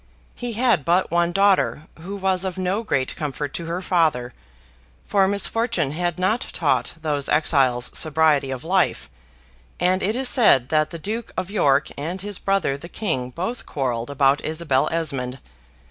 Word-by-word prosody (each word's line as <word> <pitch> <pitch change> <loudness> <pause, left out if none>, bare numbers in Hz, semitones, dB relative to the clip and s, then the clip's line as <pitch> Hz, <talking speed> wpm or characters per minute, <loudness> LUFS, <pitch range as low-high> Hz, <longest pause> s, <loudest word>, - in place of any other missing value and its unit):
He 245 -1 -5
had 230 - +2
but 175 +4 +1
one 170 0 +2
daughter, 195 -5 +2 0.2
who 190 +5 -7
was 190 -1 0
of 190 -1 -4
no 190 +3 -1
great 135 - -1
comfort 145 -1 -4
to 170 - -4
her 170 +3 -4
father; 155 -10 +1 0.7
for 195 -2 +2
misfortune 200 - +1
had 175 +2 -2
not 200 +7 +1
taught - - 0
those 150 -3 -2
exiles 135 -5 +2
sobriety 155 -3 +2
of 130 +1 -5
life; 185 +2 +1 0.7
and 185 +1 +2
it 210 +4 0
is 260 +1 +3
said 170 - +5
that 155 0 +2
the 170 - -7
Duke 215 +8 -5
of 185 +1 -3
York 145 -8 +2
and 170 +6 -4
his 205 0 -5
brother 195 -8 0
the 170 +4 -11
King 145 - -3
both 185 - -5
quarrelled 120 -4 -2
about 140 0 +2
Isabel 155 -4 0
Esmond. 135 -6 -1
170 Hz, 160 wpm, -22 LUFS, 140-195 Hz, 0.7 s, said